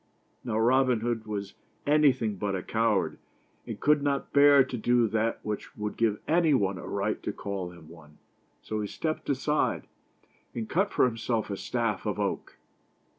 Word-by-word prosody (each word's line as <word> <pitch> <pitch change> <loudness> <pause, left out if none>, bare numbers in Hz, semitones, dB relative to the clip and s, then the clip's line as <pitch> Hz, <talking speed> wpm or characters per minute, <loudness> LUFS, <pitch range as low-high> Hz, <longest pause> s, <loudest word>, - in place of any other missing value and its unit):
Now 110 -3 -2
Robin 125 0 +3
Hood 115 -1 -2
was 100 -2 -4 0.3
anything 130 -8 +3
but 100 0 -2
a 90 - -4
coward, 115 +1 0 0.5
and - - -6
could 150 0 +3
not 140 -1 -1
bear 140 -1 +7
to 130 -1 -6
do 120 0 +2
that 110 +1 0
which 105 -1 -5
would 105 0 -3
give 110 -3 +1
anybody 140 - +2
a - - -8
right 100 +2 -2
to - - -3
call 100 -3 -5
him 85 -3 -14
one; 80 -2 -15 0.5
so 110 0 -3
he 105 - -3
stepped 155 +8 -4
aside 145 +2 0 0.7
and 115 -2 -3
cut 195 - +1
for - - +3
himself 115 -2 -1
a - - -1
staff 115 -1 -2
of - - -2
oak. - - -3
115 Hz, 170 wpm, -28 LUFS, 105-135 Hz, 0.7 s, bear